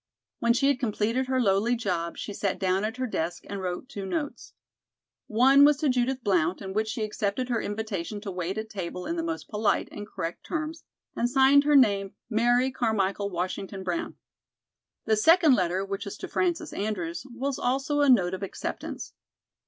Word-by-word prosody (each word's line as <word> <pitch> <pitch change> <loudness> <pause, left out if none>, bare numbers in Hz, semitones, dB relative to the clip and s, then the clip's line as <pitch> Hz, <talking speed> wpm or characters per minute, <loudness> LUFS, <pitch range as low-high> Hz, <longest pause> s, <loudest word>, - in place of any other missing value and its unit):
When 235 0 +3
she 265 +3 +2
had 280 -3 +2
completed 230 +2 0
her 260 0 +1
lowly 215 +2 +2
job 180 -7 -2
she 205 - -5
sat 200 -1 -1
down 190 +1 +1
at 220 +3 -3
her 255 - -1
desk 175 -6 -3
and 200 -1 -5
wrote 180 +5 -4
two 210 -7 -7
notes. 290 +6 -4 0.7
One 265 +5 +6
was 290 0 +6
to 295 -1 +1
Judith 255 0 0
Blount, 180 -3 +1
in 190 -1 -6
which 215 +2 0
she 220 0 -3
accepted 215 +4 -2
her 235 -2 0
invitation 205 -2 -4
to 200 -2 -5
wait 180 +2 -3
at 220 0 -3
table 180 -3 -5
in 335 - -2
the 335 - -1
most 330 0 -4
polite 210 0 0
and 205 0 -7
correct 170 -4 -5
terms, 315 0 -4 0.3
and 240 - +1
signed 270 +2 +5
her 295 0 +4
name 200 -7 +4 0.2
"Mary 245 +4 +3
Carmichael 205 -5 0
Washington 185 +2 -4
Brown." 175 -2 -3 0.9
The 220 - +3
second 320 - +6
letter, 185 -3 +1
which 195 +1 -4
was 200 - -6
to - - -6
Frances 345 -3 -1
Andrews, 195 0 -3
was 265 +3 -3
also 270 +4 0
a 285 - +4
note 190 -8 +4
of 190 - -4
acceptance. 195 - -5
220 Hz, 185 wpm, -27 LUFS, 195-260 Hz, 0.9 s, One